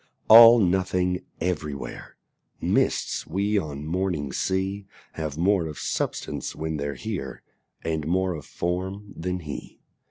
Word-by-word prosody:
All 115 +1 +11
nothing 90 -2 +1
everywhere: 75 -5 -4 0.4
Mists - - 0
we 100 +2 +1
on 75 -4 -6
mornings 85 -5 -2
see 95 +1 -1 0.2
Have 80 -2 -5
more 90 0 +2
of 75 - -7
substance - - -3
when 80 0 -3
they're 70 0 -3
here 90 -13 -5 0.4
And 80 -2 -2
more 95 +2 +1
of 75 -3 -8
form 95 +4 -3
than 90 +2 -3
he. 75 -3 -8
90 Hz, 125 wpm, -25 LUFS, 80-95 Hz, 0.4 s, All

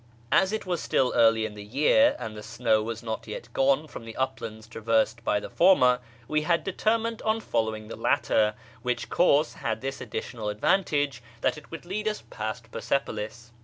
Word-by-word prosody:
As 190 +1 +4
it 220 - -3
was 175 -2 -1
still 130 -2 +1
early 115 -1 +5
in 110 - -5
the 105 0 -9
year, 150 - +4
and 110 -1 -6
the 105 - -7
snow 110 0 +1
was 115 +1 -5
not 110 0 -4
yet 110 +2 -7
gone 140 +3 +2
from 130 - -9
the 115 0 -9
uplands 110 -4 -3
traversed 115 +1 0
by 105 - +2
the - - -7
former, 125 -9 +5 0.3
we 150 0 +1
had 170 +2 +1
determined 225 +3 0
on 220 +1 +1
following 110 - -2
the - - -7
latter, 110 0 +2 0.3
which 125 -1 -2
course 155 -3 +3
had 110 -1 -3
this 135 0 -4
additional 110 -4 -4
advantage, 145 - +1 0.2
that - - +2
it 150 - -13
would 165 +1 -8
lead 210 +4 -3
us 215 0 -2
past 110 +1 -5
Persepolis. 115 -1 -3
120 Hz, 185 wpm, -27 LUFS, 110-155 Hz, 0.3 s, early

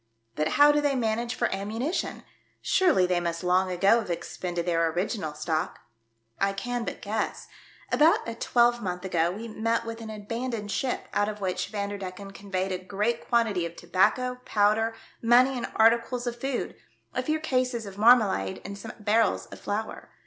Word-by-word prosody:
But 150 +4 0
how 290 +1 +8
do 295 0 +2
they 290 -2 +1
manage 235 0 -1
for 240 - +1
ammunition? 220 - -3 0.4
Surely 340 - +3
they 180 -1 +1
must 170 0 -3
long 185 +1 +2
ago 195 +6 +4
have 210 - -6
expended 175 0 -3
their 165 -2 +2
original 175 -1 -2
^tock? 155 +1 -2 0.2
" 115 0 -47
" 115 0 -34
I - - -4
can 240 +4 -3
but - - -6
guess. 215 +2 -3 0.4
About 310 -2 +4
a 230 - -3
twelvemonth 235 -6 +1
ago 170 -2 +1
we 215 +6 -6
met 230 +1 -1
with 230 0 -6
an 220 - -7
abandoned 220 0 -4
ship, 255 +2 -2
out 205 +1 +2
of 210 0 -6
which 185 -2 -2
Vanderdecken 200 -2 -5
conveyed 195 -1 -3
a 185 - -2
great 205 +5 -2
quantity 225 -7 +2
of 170 0 -5
tobacco, 250 +9 +1
powder, 220 +2 +2 0.3
money 250 +3 +5
and 245 - -4
articles 235 +2 +3
of 240 0 -4
food, 270 -2 -2 0.4
a - - 0
few 310 0 -1
cases 255 -6 -1
of 200 0 -9
marmalade 210 - +4
and 200 0 -7
some 225 - -8
barrels 210 - +2
of - - -9
flour. 215 +2 -4
210 Hz, 175 wpm, -27 LUFS, 185-235 Hz, 0.4 s, how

